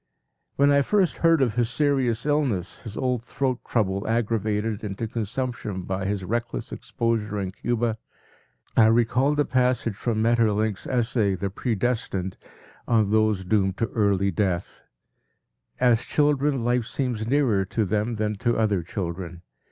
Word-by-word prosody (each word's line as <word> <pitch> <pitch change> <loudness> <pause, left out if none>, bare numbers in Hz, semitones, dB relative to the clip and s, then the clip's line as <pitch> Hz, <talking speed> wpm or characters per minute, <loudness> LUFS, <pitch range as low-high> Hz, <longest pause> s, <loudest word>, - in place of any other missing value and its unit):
When 140 +1 +4
I 140 0 +5
first 190 +4 +1
heard 165 -4 +4
of 120 -5 0
his 120 -1 +1
serious 130 -4 +1
illness, 135 - -1
his 110 -4 -8
old 125 -3 -1
throat 130 0 -2
trouble 100 -4 0
aggravated 110 -2 -1
into 105 +2 -4
consumption 115 -3 -3
by 95 +1 -3
his 100 -1 -2
reckless 115 - -3
exposure 110 -3 -2
in 95 -2 -3
Cuba, 115 +1 -1 0.8
I 110 - +6
recalled 120 +6 +2
a 145 - +3
passage 125 -4 +1
from 110 +1 -1
Maeterlinck’s 110 -3 +1
essay, 115 -5 +1
“The 100 +1 -3
Pre 115 +3 -2
Destined,” 100 -5 -2 0.5
on 110 -3 +2
those 110 -3 +2
doomed 95 -1 +1
to 115 - -1
early 100 -3 +1
death: 95 -1 -2 1.0
“As 120 -2 +3
children, 145 -3 +1
life 120 -1 +1
seems 120 -5 -2
nearer 125 -7 +2
to 105 +3 -1
them 110 +4 -1
than 105 -1 -2
to 120 +2 0
other 105 -4 +1
children. 85 -1 -5
110 Hz, 145 wpm, -25 LUFS, 100-125 Hz, 1.0 s, I